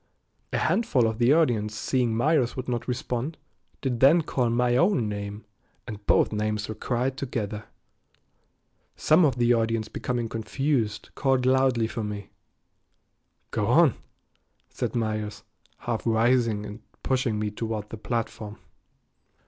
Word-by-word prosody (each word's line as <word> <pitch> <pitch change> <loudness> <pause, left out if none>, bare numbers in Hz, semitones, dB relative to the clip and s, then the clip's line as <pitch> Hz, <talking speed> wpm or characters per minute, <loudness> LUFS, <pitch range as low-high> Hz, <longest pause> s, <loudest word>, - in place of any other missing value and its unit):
A - - 0
handful 140 - +2
of 110 0 -1
the 120 +2 +4
audience 120 -10 +2
seeing 120 0 0
Myers 135 -1 +2
would 130 0 -5
not 120 -2 -2
respond, 125 +4 -3 0.4
did 125 -4 -1
then 155 +6 +6
call 125 -5 0
my 120 +1 +2
own 170 - +3
name, 100 +1 -5 0.4
and 105 -1 -8
both - - +3
names 105 0 -1
were 110 - -4
cried 125 +4 -1
together. 110 -5 -4 1.3
Some 160 +4 +4
of 140 -6 +3
the 120 0 +4
audience 115 -1 0
becoming 120 -2 -2
confused 115 0 -2
called 130 -2 +1
loudly 130 -3 +3
for 115 0 -4
me. 105 -1 -6 1.2
"Go - - -1
on," - - +5 0.8
said - - -3
Myers, 110 -2 -2 0.3
half 115 -2 -3
rising 115 -2 +2
and 105 +1 -8 0.2
pushing 130 -4 0
me 105 0 -2
toward 110 -1 -4
the 115 - -6
platform. 110 -2 -4
115 Hz, 135 wpm, -26 LUFS, 110-130 Hz, 1.3 s, then